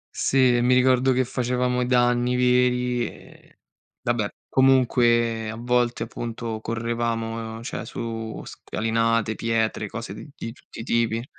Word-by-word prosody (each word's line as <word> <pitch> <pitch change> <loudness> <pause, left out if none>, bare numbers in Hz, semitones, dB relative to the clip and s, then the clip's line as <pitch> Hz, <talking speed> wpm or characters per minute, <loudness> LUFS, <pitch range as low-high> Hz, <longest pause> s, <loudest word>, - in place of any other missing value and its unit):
Sì, 130 -2 +3
mi 125 +1 +4
ricordo 130 +1 +4
che 130 0 +2
facevamo 125 0 0
i 125 - 0
danni 125 0 +2
veri 125 -1 +2
e - - -15 0.5
vabbè. 120 -4 0 0.2
Comunque, 120 -4 +3
a 110 - -5
volte, 120 0 0
appunto, 115 -1 -5
correvamo, 115 0 -3
cioè, 125 - -5
su 115 -1 -5
scalinate, 115 0 -1
pietre, 110 -1 -1
cose 110 -1 -6
di 115 +2 -8
tutti 120 - -12
i - - -6
tipi. 115 0 0
120 Hz, 125 wpm, -24 LUFS, 115-125 Hz, 0.5 s, mi